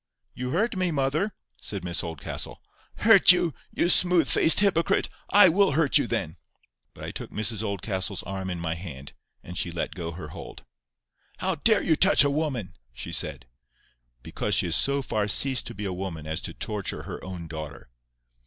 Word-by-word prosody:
"You 125 Hz, 0 st, -5 dB
hurt 205 Hz, -, 0 dB
me, 185 Hz, -1 st, 0 dB
mother," 150 Hz, +6 st, 0 dB, 0.3 s
said 100 Hz, -4 st, -4 dB
Miss 85 Hz, -1 st, -2 dB
Oldcastle. 80 Hz, -3 st, -6 dB, 0.4 s
"Hurt -, -, +7 dB
you? 175 Hz, -3 st, +1 dB, 0.2 s
you -, -, 0 dB
smooth 175 Hz, -3 st, +4 dB
faced 160 Hz, -, +6 dB
hypocrite! 190 Hz, -5 st, +2 dB, 0.2 s
I 205 Hz, 0 st, +8 dB
will 185 Hz, -1 st, +3 dB
hurt 150 Hz, -2 st, +3 dB
you -, -, -1 dB
then!" -, -, -3 dB, 0.6 s
But -, -, -11 dB
I -, -, -5 dB
took -, -, -7 dB
Mrs 110 Hz, 0 st, -1 dB
Oldcastle's 100 Hz, -2 st, -3 dB
arm 95 Hz, 0 st, -5 dB
in 90 Hz, -2 st, -4 dB
my 80 Hz, -1 st, -2 dB
hand, 80 Hz, -6 st, -9 dB, 0.3 s
and 90 Hz, -, -9 dB
she 90 Hz, -, -1 dB
let 85 Hz, -1 st, -4 dB
go 85 Hz, -3 st, -6 dB
her 85 Hz, -, -8 dB
hold. -, -, -11 dB, 0.7 s
"How 190 Hz, 0 st, -1 dB
dare 210 Hz, +7 st, +3 dB
you 160 Hz, -, +2 dB
touch 190 Hz, +1 st, +5 dB
a 140 Hz, -, +1 dB
woman?" 135 Hz, -, -3 dB, 0.2 s
she -, -, -7 dB
said. 65 Hz, -3 st, -3 dB, 0.8 s
"Because -, -, -2 dB
she -, -, +1 dB
has 85 Hz, -2 st, 0 dB
so 140 Hz, 0 st, 0 dB
far 105 Hz, -4 st, -1 dB
ceased 130 Hz, +5 st, +4 dB
to -, -, -7 dB
be 105 Hz, +1 st, -6 dB
a 95 Hz, -, -3 dB
woman 90 Hz, -4 st, -6 dB
as 80 Hz, +2 st, -4 dB
to 85 Hz, -, -5 dB
torture 105 Hz, 0 st, -4 dB
her -, -, -8 dB
own 90 Hz, -3 st, -7 dB
daughter." 75 Hz, -5 st, -8 dB
105 Hz, 185 wpm, -25 LUFS, -, 0.8 s, I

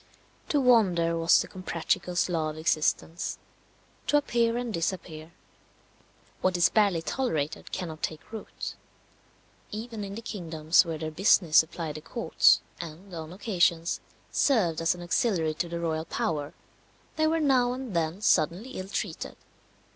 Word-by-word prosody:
To 295 Hz, -, +3 dB
wander 190 Hz, -10 st, +4 dB
was 165 Hz, 0 st, +4 dB
the -, -, -10 dB
Comprachicos' 180 Hz, -1 st, -1 dB
law 160 Hz, -3 st, -1 dB
of 155 Hz, -, -7 dB
existence 160 Hz, +1 st, 0 dB, 0.7 s
to 295 Hz, -, +4 dB
appear 235 Hz, -4 st, +1 dB
and 240 Hz, -2 st, -3 dB
disappear. 165 Hz, -2 st, -3 dB, 1.1 s
What 185 Hz, -1 st, +2 dB
is 175 Hz, -, +5 dB
barely 200 Hz, -6 st, +2 dB
tolerated 160 Hz, -, -2 dB
cannot 165 Hz, -4 st, -5 dB
take 155 Hz, +5 st, -5 dB
root. 220 Hz, -2 st, -6 dB, 1.0 s
Even 220 Hz, 0 st, -6 dB
in 200 Hz, 0 st, -6 dB
the 230 Hz, -, -7 dB
kingdoms 165 Hz, -5 st, +2 dB
where 165 Hz, -1 st, -3 dB
their 155 Hz, 0 st, -4 dB
business 170 Hz, -1 st, +4 dB
supplied 160 Hz, -1 st, +2 dB
the -, -, -8 dB
courts, 235 Hz, +9 st, +3 dB, 0.2 s
and, 175 Hz, +3 st, -9 dB
on 160 Hz, -1 st, -6 dB
occasions, 175 Hz, -4 st, +1 dB, 0.3 s
served 185 Hz, -, +2 dB
as 165 Hz, +2 st, +2 dB
an 175 Hz, -, -9 dB
auxiliary 175 Hz, -4 st, +1 dB
to 170 Hz, +2 st, -3 dB
the 170 Hz, 0 st, -4 dB
royal 160 Hz, -1 st, -2 dB
power, 150 Hz, -4 st, -2 dB, 0.6 s
they 315 Hz, 0 st, +2 dB
were 325 Hz, +1 st, +2 dB
now 260 Hz, -5 st, +3 dB
and 255 Hz, -6 st, -6 dB
then 165 Hz, +3 st, -1 dB
suddenly 185 Hz, +6 st, +2 dB
ill 185 Hz, -7 st, -6 dB
treated. 200 Hz, -, -4 dB
175 Hz, 145 wpm, -28 LUFS, 160-220 Hz, 1.1 s, is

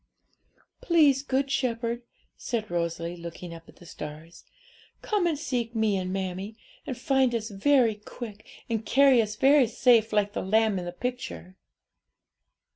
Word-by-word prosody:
'Please, 295 Hz, -6 st, +4 dB
Good 275 Hz, 0 st, -1 dB
Shepherd,' 235 Hz, -2 st, -1 dB, 0.3 s
said 220 Hz, -5 st, -4 dB
Rosalie, 170 Hz, 0 st, -2 dB
looking 170 Hz, 0 st, -8 dB
up 165 Hz, 0 st, -12 dB
at -, -, -16 dB
the 175 Hz, -, -16 dB
stars, 155 Hz, +1 st, -9 dB, 0.6 s
'come 410 Hz, -5 st, +1 dB
and 320 Hz, -3 st, 0 dB
seek 245 Hz, -5 st, -3 dB
me 220 Hz, -2 st, +2 dB
and 185 Hz, -1 st, -2 dB
mammie, 190 Hz, +3 st, -4 dB, 0.3 s
and 260 Hz, -4 st, -4 dB
find 260 Hz, -1 st, +2 dB
us 220 Hz, -1 st, -3 dB
very 235 Hz, +3 st, +3 dB
quick, 210 Hz, 0 st, -9 dB, 0.2 s
and 225 Hz, -2 st, -2 dB
carry 270 Hz, 0 st, +5 dB
us 210 Hz, -1 st, -3 dB
very 270 Hz, +2 st, +5 dB
safe, 230 Hz, -1 st, +3 dB
like 205 Hz, -1 st, +1 dB
the -, -, -2 dB
lamb 215 Hz, 0 st, +2 dB
in 175 Hz, -, -6 dB
the 175 Hz, -, -4 dB
picture.' 240 Hz, -3 st, -6 dB
220 Hz, 150 wpm, -27 LUFS, 185-255 Hz, 0.6 s, carry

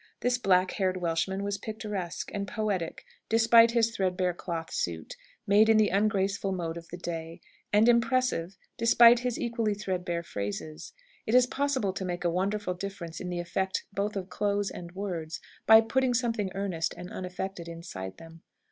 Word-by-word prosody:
This 245 Hz, 0 st, +1 dB
black 185 Hz, -4 st, +3 dB
haired 185 Hz, -2 st, 0 dB
Welshman 180 Hz, +3 st, -1 dB
was 200 Hz, 0 st, -2 dB
picturesque 210 Hz, -5 st, -5 dB
and 200 Hz, -1 st, -3 dB
poetic, 200 Hz, -7 st, -3 dB, 0.2 s
despite 230 Hz, +1 st, +6 dB
his 230 Hz, -1 st, +1 dB
threadbare 185 Hz, -1 st, 0 dB
cloth 165 Hz, -2 st, -5 dB
suit, 80 Hz, -2 st, -3 dB, 0.3 s
made 210 Hz, +2 st, +5 dB
in 220 Hz, -, +6 dB
the 215 Hz, -1 st, +4 dB
ungraceful 200 Hz, -1 st, +1 dB
mode 170 Hz, -3 st, -3 dB
of 170 Hz, 0 st, -9 dB
the 175 Hz, -, -8 dB
day; 165 Hz, -1 st, -6 dB, 0.3 s
and 210 Hz, +2 st, +5 dB
impressive, 235 Hz, -7 st, +2 dB, 0.2 s
despite 235 Hz, +1 st, +7 dB
his 245 Hz, -1 st, -2 dB
equally 230 Hz, -3 st, -1 dB
threadbare 180 Hz, -4 st, -3 dB
phrases. 85 Hz, -, -5 dB, 0.3 s
It 220 Hz, -, +2 dB
is 250 Hz, 0 st, +7 dB
possible 260 Hz, -7 st, -1 dB
to 190 Hz, -, -4 dB
make 180 Hz, -1 st, -3 dB
a 175 Hz, -, +1 dB
wonderful 195 Hz, +2 st, -1 dB
difference 180 Hz, -3 st, -6 dB
in 180 Hz, -, -5 dB
the 175 Hz, -1 st, -3 dB
effect 190 Hz, +2 st, -2 dB
both 205 Hz, +1 st, -2 dB
of 190 Hz, -2 st, -3 dB
clothes 205 Hz, -1 st, 0 dB
and 170 Hz, -1 st, -8 dB
words, 170 Hz, -5 st, -4 dB, 0.3 s
by 220 Hz, 0 st, +9 dB
putting 255 Hz, +2 st, +1 dB
something 230 Hz, -5 st, 0 dB
earnest 190 Hz, -5 st, -2 dB
and 180 Hz, +3 st, -8 dB
unaffected 180 Hz, -2 st, -5 dB
inside 135 Hz, -, -7 dB
them. 165 Hz, 0 st, -13 dB
195 Hz, 165 wpm, -28 LUFS, 175-220 Hz, 0.3 s, by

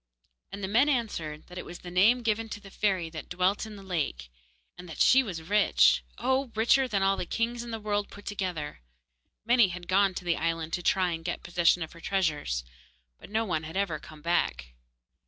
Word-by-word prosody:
And 200 Hz, 0 st, -7 dB
the -, -, -1 dB
men 240 Hz, +9 st, +4 dB
answered 170 Hz, -, -2 dB
that 180 Hz, 0 st, -9 dB
it -, -, -5 dB
was 175 Hz, -, -8 dB
the 175 Hz, -, -10 dB
name 220 Hz, +7 st, +4 dB
given 225 Hz, 0 st, 0 dB
to 215 Hz, -, -6 dB
the 195 Hz, -1 st, -14 dB
fairy 190 Hz, -5 st, 0 dB
that 160 Hz, -, -8 dB
dwelt 185 Hz, +4 st, 0 dB
in 215 Hz, -, -9 dB
the 200 Hz, -, -11 dB
lake, 145 Hz, -, -3 dB, 0.4 s
and 180 Hz, 0 st, -11 dB
that 160 Hz, -, -8 dB
she 265 Hz, -, +6 dB
was 180 Hz, -10 st, -5 dB
rich 65 Hz, -, +4 dB
oh! 260 Hz, -1 st, 0 dB
richer 240 Hz, +4 st, +4 dB
than 200 Hz, -5 st, 0 dB
all 195 Hz, 0 st, +3 dB
the -, -, -3 dB
kings 235 Hz, +1 st, -1 dB
in 240 Hz, -, -8 dB
the 225 Hz, -1 st, -4 dB
world 205 Hz, -1 st, -1 dB
put 205 Hz, -, -13 dB
together. 180 Hz, -, -4 dB, 0.6 s
Many 240 Hz, -2 st, +5 dB
had 180 Hz, -1 st, -7 dB
gone 195 Hz, 0 st, +3 dB
to 180 Hz, -, -6 dB
the 170 Hz, -1 st, +1 dB
island 165 Hz, 0 st, -2 dB
to 175 Hz, -, -1 dB
try 185 Hz, 0 st, +2 dB
and 165 Hz, -1 st, -4 dB
get 175 Hz, +1 st, -4 dB
possession 175 Hz, -1 st, +2 dB
of 160 Hz, -, -8 dB
her 170 Hz, -, -14 dB
treasures, 150 Hz, -, -1 dB, 0.6 s
but -, -, -13 dB
no 220 Hz, +2 st, 0 dB
one 170 Hz, -6 st, -1 dB
had 160 Hz, +3 st, -6 dB
ever 185 Hz, -6 st, 0 dB
come 150 Hz, +1 st, -13 dB
back. 165 Hz, -, 0 dB
185 Hz, 215 wpm, -28 LUFS, 165-210 Hz, 0.6 s, she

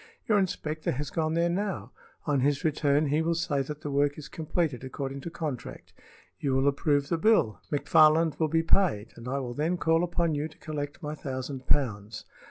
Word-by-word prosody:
Your 215 Hz, -3 st, +4 dB
inspector 155 Hz, -4 st, -2 dB
has 145 Hz, +3 st, -4 dB
gone 160 Hz, -1 st, 0 dB
there 170 Hz, +1 st, +3 dB
now; 175 Hz, -, -2 dB, 0.3 s
on 145 Hz, -3 st, +2 dB
his 140 Hz, +1 st, +1 dB
return 150 Hz, -1 st, +2 dB
he 150 Hz, +3 st, +2 dB
will 165 Hz, +1 st, +1 dB
say 145 Hz, -4 st, 0 dB
that 150 Hz, +2 st, -6 dB
the 145 Hz, -, -4 dB
work 145 Hz, +1 st, +2 dB
is 150 Hz, -2 st, -9 dB
completed 155 Hz, -4 st, -2 dB
according 135 Hz, +1 st, -5 dB
to 170 Hz, -, -5 dB
contract. 155 Hz, -7 st, -6 dB, 0.5 s
You 135 Hz, -2 st, 0 dB
will 135 Hz, +1 st, +2 dB
approve 140 Hz, 0 st, +1 dB
the 165 Hz, -, 0 dB
bill, 185 Hz, -, +3 dB
McFarland 155 Hz, +2 st, +4 dB
will 160 Hz, -, +3 dB
be 165 Hz, +1 st, +1 dB
paid, 160 Hz, -, +2 dB
and 115 Hz, +1 st, -10 dB
I 135 Hz, -, -1 dB
will 125 Hz, -3 st, -3 dB
then 160 Hz, +6 st, 0 dB
call 165 Hz, 0 st, +2 dB
upon 170 Hz, -2 st, 0 dB
you 145 Hz, +1 st, -1 dB
to 160 Hz, -, -18 dB
collect 150 Hz, +1 st, -5 dB
my 150 Hz, 0 st, -3 dB
thousand 130 Hz, -2 st, -5 dB
pounds. 110 Hz, -6 st, 0 dB
150 Hz, 195 wpm, -28 LUFS, 135-165 Hz, 0.5 s, Your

